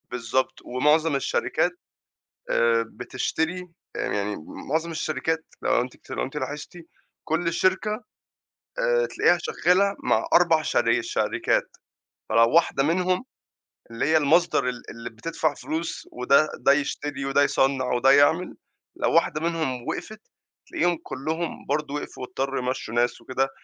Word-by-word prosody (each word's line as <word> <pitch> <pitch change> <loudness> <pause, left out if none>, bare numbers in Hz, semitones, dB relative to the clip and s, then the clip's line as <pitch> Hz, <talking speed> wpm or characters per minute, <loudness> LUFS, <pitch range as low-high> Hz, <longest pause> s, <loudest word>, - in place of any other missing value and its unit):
بالضبط، 125 +2 -1
ومُعظم 150 +4 +2
الشركات 135 - 0 0.8
آآ 115 -1 +3
بتشتري 160 - -3 0.3
آآ - - -4
يعني 105 0 -1 0.3
مُعظم 160 +3 0
الشركات 160 0 -2 0.2
لو - - +2
أنتِ 125 +1 -6
اكت - - -23
لو - - -2
أنتِ 135 - -6
لاحظتِ 145 +5 -5 0.5
كُلّ 165 +1 -1
شركة، 185 +4 +1 0.9
آآ - - +2
تلاقيها - - +3
شَغّالة 200 - +2
مع - - +2
4 165 -3 +5
شر - - +2
شركات، - - -1 0.5
فلو 115 0 +4
واحدة 165 -4 +4
منهم 180 - +1 0.7
اللي 115 - -2
هي 160 +2 +4
المصدر 155 -3 +3
ال 125 - -6
اللي 115 +1 -7
بتدفع 155 +6 -2
فلوس 160 +3 -5
وده 140 +5 +3
ده 130 - +4
يشتري 145 0 -2
وده 135 +1 +3
يصّنع 135 -1 +2
وده 125 +2 +4
يعمل، 145 +6 +4 0.4
لو - - 0
واحدة 160 -2 +2
منهم 160 -7 -2
وقفت، 215 0 -5 0.5
تلاقيهم 175 -1 +1
كُلّهم 155 +5 -4
برضه 145 0 -1
وقفوا 145 - -6
واضطروا 135 +2 -2
يمشّوا 125 -3 -3
ناس 120 +1 +1
وكده، 135 +1 -1
150 Hz, 135 wpm, -25 LUFS, 130-165 Hz, 0.9 s, 4